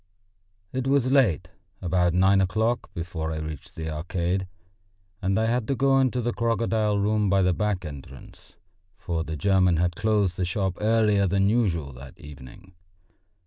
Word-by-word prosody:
It 130 0 -2
was 135 -2 +2
late, 125 - +2 0.3
about 90 -1 +1
nine 95 +1 +4
o'clock, 110 +5 -1
before 85 -1 -4
I 80 - -3
reached 75 -2 -7
the 80 -1 -4
Arcade, 90 +4 -2 0.7
and 95 +1 0
I 110 - +2
had 115 0 0
to 135 - 0
go 135 0 +3
into 125 -1 +1
the 120 +1 -1
crocodile 115 -2 0
room 105 0 +1
by 95 0 +3
the 90 0 +2
back 100 -2 -1
entrance, 70 -3 -11 0.4
for 85 -5 -3
the 80 -1 -5
German 95 -2 +3
had 85 +1 0
closed 105 -3 +1
the 95 - -1
shop 95 0 -2
earlier 105 -2 +3
than 95 +1 +2
usual 85 - 0
that 60 +1 -12
evening. 75 +6 -13
95 Hz, 160 wpm, -25 LUFS, 85-110 Hz, 0.7 s, nine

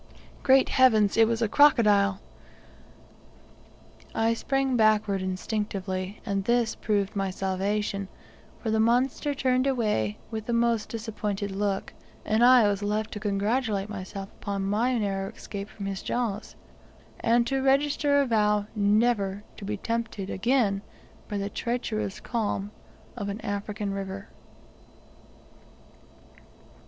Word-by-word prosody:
Great 265 0 +5
heavens, 220 -6 +4
it 225 0 +5
was 230 0 0
a - - +2
crocodile! 205 -7 +4 2.0
I 225 +1 +2
sprang 270 +2 0
backward 215 -3 +3
instinctively, 190 0 -3
and 200 -3 -1
this 235 +1 +2
proved 205 -2 -1
my 195 -1 0
salvation, 195 +1 -2 0.5
for 220 - -3
the 220 - +2
monster 255 +5 +2
turned 255 0 +1
away 210 - 0
with 220 -1 -5
the 240 - 0
most 235 -2 +1
disappointed 210 -3 -3
look, 195 0 -2 0.3
and 220 +2 +2
I 245 -3 +7
was 200 -1 0
left 210 +1 -1
to 210 - -5
congratulate 210 0 0
myself 195 -1 -6
upon 200 -1 -2
my 230 +6 +1
narrow 195 -2 -1
escape 200 0 -7
from 200 - -8
his 195 -1 -3
jaws, 225 -4 -3 0.6
and 235 +1 +3
to 270 +2 0
register 285 +1 +3
a - - +1
vow 210 -3 +2
never 205 -1 +2
to 200 - -8
be 210 +1 -3
tempted 225 -3 -3
again 210 -2 +1 0.5
by 205 - -2
the 200 0 -2
treacherous 220 -2 -3
calm 210 -3 -2 0.4
of 205 -4 -4
an 200 +2 -4
African 205 0 -3
river. 195 0 -6
210 Hz, 125 wpm, -27 LUFS, 200-235 Hz, 2.0 s, I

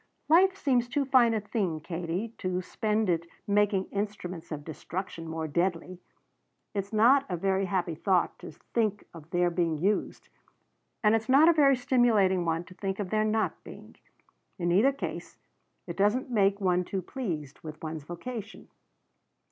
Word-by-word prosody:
"Life 375 +4 +5
seems 250 -7 +1
too 280 +3 0
fine 245 -4 +4
a - - +1
thing, 200 -6 -2
Katie, 175 +6 -4
to 185 -1 -1
spend 215 +3 -1
it 170 -1 0 0.2
making 205 -2 +2
instruments 200 -5 -5
of 150 -2 -5
destruction 165 +1 -6
more 160 0 -3
deadly. 175 +2 -1 0.7
It's 200 -1 -3
not 240 +6 +5
a 180 - -2
very 195 +2 +1
happy 180 -3 -1
thought 180 +2 0
to - - -9 0.2
think 215 -3 0
of 165 -2 -12
their 175 0 +1
being 170 -2 0
used; 195 +7 -1 0.7
and 210 0 +5
it's 225 +1 0
not 280 +5 +7
a - - +6
very 280 -4 +5
stimulating 225 -8 +2
one 165 0 0
to 185 - -14
think 195 +1 -4
of 200 -3 -4
their 215 0 +2
not 215 0 -1
being. - - -12 0.6
In 175 -2 0
either 215 +10 +5
case, 275 - -6 0.5
it - - -7
doesn't 210 +6 +1
make 200 -3 +2
one 180 -2 +2
too 190 +1 -4
pleased 165 - -5
with 155 0 -10
one's 155 -2 -5
vocation. 215 +6 -7
195 Hz, 165 wpm, -28 LUFS, 175-225 Hz, 0.7 s, not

